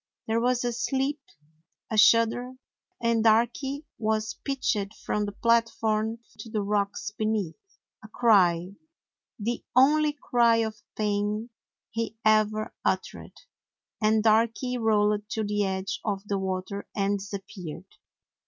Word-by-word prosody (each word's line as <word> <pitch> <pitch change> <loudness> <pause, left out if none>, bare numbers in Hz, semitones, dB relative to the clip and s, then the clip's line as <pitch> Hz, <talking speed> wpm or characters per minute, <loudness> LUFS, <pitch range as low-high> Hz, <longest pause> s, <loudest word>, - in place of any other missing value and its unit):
There 225 +1 +1
was 250 0 +1
a 240 -1 -1
slip, 270 +4 -1 0.7
a - - 0
shudder, 230 +3 +4 0.5
and 230 -1 +1
Darky 240 +6 +2
was 220 0 0
pitched 225 -7 -1
from 210 0 0
the - - -4
platform 225 0 +1 0.2
to 225 - -8
the 215 -2 -1
rocks 200 -1 -1
be 215 +1 -3
neath. 215 - -4 0.3
A - - -10
cry 190 -6 +3 0.4
— - - -58
the 240 0 -1
only 300 +3 +5
cry 240 -5 +3
of 215 -1 -7 0.2
pain 210 +2 -1 0.4
he 225 -1 -3
ever 215 0 +2
uttered, - - -3 0.3
— - - -59
and 215 0 +3
Darky 230 +3 +2
rolled 210 -2 +1
to 220 - -2
the 205 0 0
edge 190 0 -3
of 200 -3 -2
the 200 -1 -1
water 190 +1 -4
and 200 0 +1
disappeared. 195 -4 -8
220 Hz, 135 wpm, -27 LUFS, 205-235 Hz, 0.7 s, only